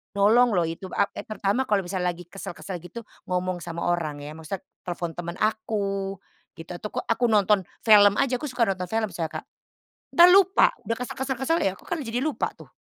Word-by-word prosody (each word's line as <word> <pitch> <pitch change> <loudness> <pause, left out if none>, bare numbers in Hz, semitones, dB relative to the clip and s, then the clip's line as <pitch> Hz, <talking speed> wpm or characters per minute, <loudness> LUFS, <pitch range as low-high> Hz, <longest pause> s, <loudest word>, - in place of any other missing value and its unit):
Nolong 220 +2 +4
loh 175 - +3
itu, 165 +4 -5
a 200 - +4
e - - -8
terutama 215 +4 -1
kalau 200 -2 +2
misalnya 180 0 -2
lagi 175 - -10
kesel-kesel 180 0 -7
gitu, 180 +7 -9 0.2
ngomong 180 0 -1
sama 170 0 -5
orang 155 -5 -1
ya 150 - -7
maksudnya 160 +4 -7 0.2
telepon 175 -1 -3
temen 170 +1 -6
aku 200 -3 -1 0.4
gitu 165 +2 -10
atau 175 +4 -5
kok - - -4
aku 235 +1 +1
nonton 205 -3 +3 0.2
film 205 -2 +7
aja, 250 -2 +1
aku 300 - -4
suka 245 -2 0
nonton 190 -4 -1
film 220 -3 -1
soalnya 165 -2 -4
Kak. - - -41 0.7
Entar 345 +1 +8
lupa, 395 +6 +5
udah 230 - -2
kesel 250 - -5
kesel 265 -1 -2
kesel, 325 +5 +1
ya 195 - +2
aku - - -19
kan 345 - -1
jadi 235 +1 -2
lupa 285 -3 -1
tuh. - - -12
200 Hz, 205 wpm, -25 LUFS, 175-230 Hz, 0.7 s, Entar